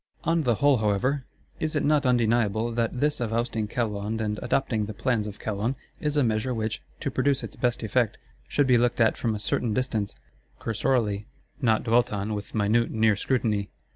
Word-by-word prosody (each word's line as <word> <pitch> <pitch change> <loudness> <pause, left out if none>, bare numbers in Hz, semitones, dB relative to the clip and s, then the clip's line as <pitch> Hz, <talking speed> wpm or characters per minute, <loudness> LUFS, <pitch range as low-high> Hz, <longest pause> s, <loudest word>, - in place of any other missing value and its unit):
On 165 +1 +2
the 120 -6 +2
whole, 140 +2 +4
however, 120 +6 0 0.3
is 155 0 -1
it 150 - +1
not 145 -2 +3
undeniable 115 -2 +2
that 115 +1 -1
this 150 0 +1
of 115 -3 -2
ousting 115 -2 -1
Calonne 105 -1 -2
and 105 -1 -2
adopting 120 -4 0
the 110 - -6
plans 115 -4 0
of 105 - -7
Calonne, 110 +4 -2 0.2
is 150 0 -1
a 145 - +4
measure 115 +2 0
which, 110 -1 -2 0.2
to - - -2
produce 140 -1 +1
its - - -7
best 120 -2 0
effect, 110 +1 +1 0.3
should 145 - +2
be 125 -2 +5
looked 120 0 +1
at 115 -1 +4
from 115 -3 -1
a - - -4
certain 105 +2 -1
distance, 110 -6 -1 0.4
cursorily; 110 -2 0 0.3
not 115 -4 +3
dwelt 120 +1 +3
on 105 +1 -2
with 105 0 -6
minute 110 +3 +2
near 110 -1 +3
scrutiny. 105 -3 0
115 Hz, 190 wpm, -26 LUFS, 105-125 Hz, 0.4 s, be